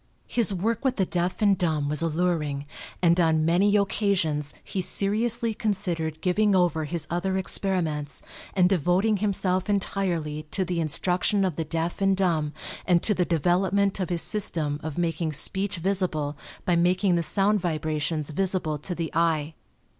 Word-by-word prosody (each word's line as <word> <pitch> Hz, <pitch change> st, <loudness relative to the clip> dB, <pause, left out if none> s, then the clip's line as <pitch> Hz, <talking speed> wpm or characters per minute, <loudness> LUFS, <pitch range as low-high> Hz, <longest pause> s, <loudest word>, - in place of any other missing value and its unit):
His 235 Hz, -4 st, +1 dB
work 210 Hz, +7 st, -1 dB
with 265 Hz, -2 st, +1 dB
the 190 Hz, -, +1 dB
deaf 180 Hz, +4 st, -1 dB
and 200 Hz, -1 st, +5 dB
dumb 160 Hz, -5 st, 0 dB
was 150 Hz, +1 st, 0 dB
alluring, 160 Hz, -4 st, -1 dB, 0.4 s
and 170 Hz, +1 st, +4 dB
on 160 Hz, -2 st, +3 dB
many 190 Hz, +5 st, +3 dB
occasions 185 Hz, -8 st, +1 dB
he 190 Hz, -, -3 dB
seriously 220 Hz, +5 st, +1 dB
considered 175 Hz, -7 st, -2 dB
giving 200 Hz, +2 st, +2 dB
over 170 Hz, -4 st, +2 dB
his 165 Hz, 0 st, -1 dB
other 190 Hz, +2 st, 0 dB
experiments 165 Hz, -6 st, -1 dB, 0.3 s
and 180 Hz, -2 st, +5 dB
devoting 190 Hz, +4 st, +2 dB
himself 190 Hz, -1 st, 0 dB
entirely 170 Hz, -7 st, -1 dB
to 190 Hz, +3 st, -1 dB
the 175 Hz, -1 st, -2 dB
instruction 180 Hz, +5 st, +1 dB
of 180 Hz, -5 st, -1 dB
the 160 Hz, -, -3 dB
deaf 165 Hz, +4 st, -3 dB
and 195 Hz, -1 st, +3 dB
dumb 165 Hz, -6 st, +1 dB, 0.4 s
and 175 Hz, -2 st, +3 dB
to 210 Hz, -, +3 dB
the 180 Hz, -2 st, +1 dB
development 190 Hz, +5 st, +1 dB
of 185 Hz, -, -2 dB
his 175 Hz, -2 st, +2 dB
system 160 Hz, -8 st, -1 dB
of 155 Hz, -2 st, -6 dB
making 165 Hz, -2 st, -1 dB
speech 190 Hz, +7 st, 0 dB
visible 170 Hz, -5 st, -1 dB, 0.3 s
by 175 Hz, -, +2 dB
making 180 Hz, +2 st, +2 dB
the 170 Hz, -, +2 dB
sound 200 Hz, +6 st, +2 dB
vibrations 155 Hz, -2 st, -2 dB
visible 175 Hz, -3 st, -1 dB
to 180 Hz, +5 st, -4 dB
the 165 Hz, -2 st, -3 dB
eye. 160 Hz, -2 st, +1 dB
180 Hz, 160 wpm, -26 LUFS, 160-195 Hz, 0.4 s, and